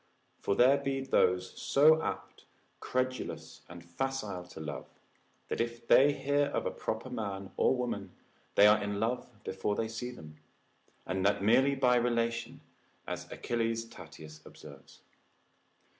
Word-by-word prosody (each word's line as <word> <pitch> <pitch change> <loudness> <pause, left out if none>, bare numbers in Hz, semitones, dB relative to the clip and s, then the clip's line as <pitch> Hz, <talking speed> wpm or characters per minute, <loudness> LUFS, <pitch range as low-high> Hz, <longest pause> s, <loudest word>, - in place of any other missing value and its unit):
For 100 - 0
there 130 +5 +5
be 135 -1 -2
those 90 -8 +2
so 155 +3 +5
apt, - - -5 0.3
credulous, 130 0 -3
and 85 0 -11
facile 100 0 -3
to 85 - -11
love, 75 -1 -6 0.6
that - - -2
if 115 0 -4
they 140 +2 +6
hear 145 +1 +1
of 140 - -2
a - - -1
proper 110 +3 -4
man, 100 -5 -5
or - - +3
woman, 125 -1 -3 0.5
they 100 - +7
are 105 +1 +6
in 100 0 -3
love 120 +4 -1
before 105 +2 -2
they 115 - -1
see 115 +2 -5
them, 75 -11 -11 0.7
and 95 0 -2
that 100 - +1
merely 135 +6 +4
by 125 -2 +3
relation, 115 -1 -1 0.4
as - - -6
Achilles 115 -1 -2
Tatius 80 -6 -12
observes. 70 -3 -14
115 Hz, 145 wpm, -31 LUFS, 95-130 Hz, 0.7 s, they